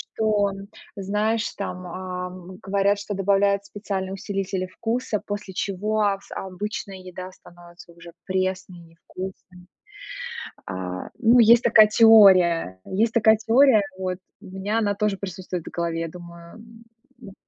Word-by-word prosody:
что, 210 -2 +2
м, 195 0 -9 0.3
знаешь, 210 +3 -1
там, 185 -2 -5
а, 180 0 -5
м, 185 0 -11
говорят, 200 +1 +1
что 205 +1 -5
добавляют 200 0 +1
специальные 195 -2 -5
усилители 195 -1 -3
вкуса, 225 +2 -3
после 205 -2 -5
чего 205 +2 0
с - - -12
обычная 195 +1 -5
еда 185 0 -9
становится 175 -1 -16
уже 170 0 -13
пресной, 185 -1 -2
невкусной. 180 +2 -11 1.0
А, 90 -1 -5
ну, 235 +1 +5
есть 235 +1 +7
такая 230 -3 +7
теория, 190 - +6
есть 220 +4 0
такая 220 -1 +5
теория, 230 +1 +4 0.2
вот. 185 -1 -3 0.2
У - - -14
меня 190 +4 -3
она 205 -2 0
тоже 210 -1 0
присутствует 185 -3 -6
в - - -7
голове. 170 -1 -2
Я 165 - -3
думаю, 170 +3 -12 0.6
м, 195 - -11
195 Hz, 135 wpm, -23 LUFS, 180-210 Hz, 1.0 s, есть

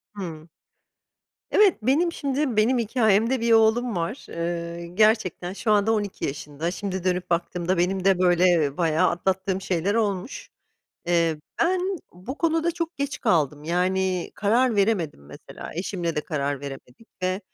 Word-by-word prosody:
Hımm. 165 -5 -7 1.0
Evet 410 -3 +4
benim 305 +9 +2
şimdi 275 -5 -1
benim 240 +4 +3
hikâyemde 230 +1 +2
bir 230 0 +2
oğlum 225 0 +3
var. 175 +9 -3
Iıı, 170 0 -4
gerçekten 215 -5 +2
şu 215 +3 -2
anda 210 +2 +3
12. 205 -9 -2 0.4
Şimdi 190 -2 -4
dönüp 180 -1 -1
baktığımda 175 +1 -1
benim 185 +1 0
de 195 -2 +4
böyle 175 -5 +3
bayağı 165 -3 +2
atlattığım 190 +2 -1
şeyler 190 +1 -1
olmuş. 215 +1 -2 0.6
Eee, 170 -2 +2 0.2
ben 360 +2 +2 0.3
bu 190 - -8
konuda 330 0 +1
çok 335 0 -4
geç 285 +1 -3
kaldım. 150 - +1
Yani 185 +1 0
karar 230 +3 +2
veremedim 195 - 0
mesela 75 - -10
eşimle 175 -2 -3
de - - +2
karar 145 -3 -2
veremedik 140 - -10
ve, 185 +1 0
190 Hz, 135 wpm, -24 LUFS, 170-225 Hz, 1.0 s, Evet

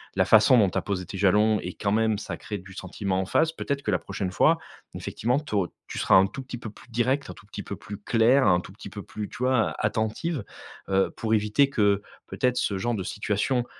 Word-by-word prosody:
la 95 - +4
façon 110 +6 +6
dont 105 -5 +5
tu - - -4
as - - +1
posé 95 -2 -3
tes 95 - -7
jalons 105 +2 +3
et 90 - -5
quand 100 - -2
même, 110 0 +2
ça - - -5
crée 105 -2 -6
du 95 +1 -13
sentiment 95 0 -3
en 95 - -1
face. 160 - +2
Peut-être 140 -3 -3
que 105 - 0
la 90 - +1
prochaine 95 -1 -4
fois, - - +4 0.4
effectivement, 125 +5 -1
tu 150 -6 -6
au 95 -3 +2 0.2
tu - - -5
seras - - +4
un 95 +1 +6
tout 135 - -7
petit 125 -1 -7
peu 115 - -7
plus 110 - -16
directe, 130 +4 0
un - - -6
tout 100 - -17
petit 105 - -7
peu 100 - -6
plus 100 +1 -8
claire, 120 +3 +4
un 90 -1 +4
tout - - -12
petit - - -10
peu - - -8
plus, 105 -1 -6
tu - - -11
vois? 125 -3 +2
A - - -3
attentive, 110 +5 -1 0.4
heu, 95 0 +2
pour 110 -1 -1
éviter 110 +6 +3
que, 105 -6 +2 0.3
peut-être, 125 -1 0
ce 105 -5 0
genre 120 +5 -1
de 95 - -3
situation, 105 +6 -1
105 Hz, 250 wpm, -26 LUFS, 95-120 Hz, 0.4 s, façon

